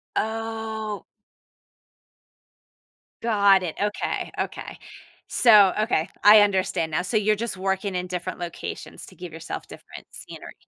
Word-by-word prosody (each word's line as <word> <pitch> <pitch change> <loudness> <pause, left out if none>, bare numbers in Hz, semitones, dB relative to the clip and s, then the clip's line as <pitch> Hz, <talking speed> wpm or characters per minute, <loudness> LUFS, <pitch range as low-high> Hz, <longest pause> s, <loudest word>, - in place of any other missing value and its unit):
Oh. 220 -1 -3 2.2
Got 200 -4 +4
it. 165 - -4
Okay, 205 0 -2
okay. - - -5 0.5
So 210 -6 +6
okay. 215 -7 0
I 210 +1 +9
understand 190 -5 +1
now. 155 - 0
So, 195 +5 -1
you're 215 0 +2
just 230 -2 -4
working 190 0 -2
in 180 0 -2
different 180 0 -5
locations 175 -1 -7
to - - -15
give 180 -2 -9
yourself 160 - -7
different - - -12
scenery. - - -11
200 Hz, 125 wpm, -24 LUFS, 180-215 Hz, 2.2 s, I